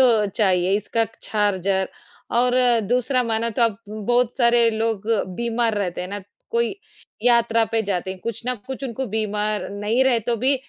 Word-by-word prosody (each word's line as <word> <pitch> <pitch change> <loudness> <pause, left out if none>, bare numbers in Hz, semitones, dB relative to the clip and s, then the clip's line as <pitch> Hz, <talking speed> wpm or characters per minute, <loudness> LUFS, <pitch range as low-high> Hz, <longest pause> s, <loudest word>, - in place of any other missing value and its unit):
तो 230 -5 +5
चाहिए, 190 -2 +1
इसका 225 +2 0 0.2
चार्जर, 195 -2 0 0.4
और 250 +1 +3 0.3
दूसरा, 250 +1 +2
माना 230 0 -1
तो 235 +2 0
अब 225 -3 +2
बहुत 235 +3 0
सारे 235 -2 +4
लोग 220 -1 -2 0.3
बीमार 235 -1 0
रहते 180 -3 -2
हैं 180 - -5
ना, 205 +1 -5 0.3
कोई 235 +7 +1 0.5
यात्रा 235 -1 +4
पे 225 - +2
जाते 190 -2 -2
हैं, 190 - -6
कुछ 230 0 -5
न 250 - +1
कुछ 265 +1 -6
उनको 260 +1 -3
बीमार 210 0 -1
नहीं 210 +5 +1
रहे, 245 -3 +3
तो 235 +2 -1
भी 260 +5 +2
225 Hz, 170 wpm, -22 LUFS, 205-240 Hz, 0.5 s, तो